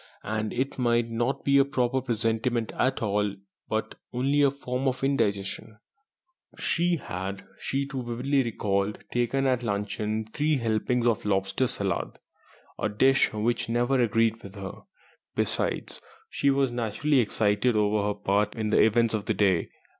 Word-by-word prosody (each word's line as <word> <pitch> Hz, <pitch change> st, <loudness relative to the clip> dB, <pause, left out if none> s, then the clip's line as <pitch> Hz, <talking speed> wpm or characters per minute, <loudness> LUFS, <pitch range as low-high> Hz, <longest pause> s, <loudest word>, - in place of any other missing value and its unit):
And 110 Hz, 0 st, -2 dB
it 135 Hz, +2 st, -2 dB
might 120 Hz, -1 st, +2 dB
not 120 Hz, +4 st, -1 dB
be 140 Hz, 0 st, +5 dB
a -, -, +7 dB
proper 130 Hz, -2 st, 0 dB
presentiment 115 Hz, -1 st, 0 dB
at 130 Hz, -2 st, +1 dB
all, 105 Hz, -1 st, 0 dB, 0.3 s
but -, -, -2 dB, 0.2 s
only 135 Hz, +4 st, +1 dB
a 140 Hz, -, +6 dB
form 135 Hz, -1 st, -3 dB
of 130 Hz, 0 st, -1 dB
indigestion. 110 Hz, -4 st, -1 dB, 0.8 s
She 175 Hz, +1 st, +1 dB
had 95 Hz, -, -5 dB
(she 140 Hz, +1 st, -1 dB
too 135 Hz, -1 st, -4 dB
vividly 125 Hz, +4 st, 0 dB
recalled) 105 Hz, -4 st, -1 dB
taken 120 Hz, +3 st, +1 dB
at 130 Hz, -2 st, +2 dB
luncheon 105 Hz, 0 st, -2 dB
three 150 Hz, 0 st, +1 dB
helpings 115 Hz, +1 st, 0 dB
of 115 Hz, -1 st, +2 dB
lobster 100 Hz, +5 st, +1 dB
salad, -, -, -2 dB, 0.6 s
a 110 Hz, -, 0 dB
dish 130 Hz, +6 st, +4 dB
which 115 Hz, +2 st, -1 dB
never 120 Hz, +3 st, +2 dB
agreed 115 Hz, 0 st, +2 dB
with 100 Hz, 0 st, -11 dB
her. 95 Hz, -1 st, -5 dB, 0.6 s
Besides, -, -, -1 dB, 0.3 s
she 140 Hz, -, +1 dB
was 135 Hz, -2 st, +2 dB
naturally 120 Hz, +5 st, +1 dB
excited 110 Hz, +1 st, +2 dB
over 105 Hz, 0 st, +2 dB
her 105 Hz, -, -1 dB
part 105 Hz, +1 st, 0 dB
in 110 Hz, -2 st, -2 dB
the -, -, +5 dB
events 115 Hz, +1 st, +3 dB
of 105 Hz, -2 st, -2 dB
the -, -, 0 dB
day. 95 Hz, -5 st, +2 dB
115 Hz, 155 wpm, -27 LUFS, 105-130 Hz, 0.8 s, a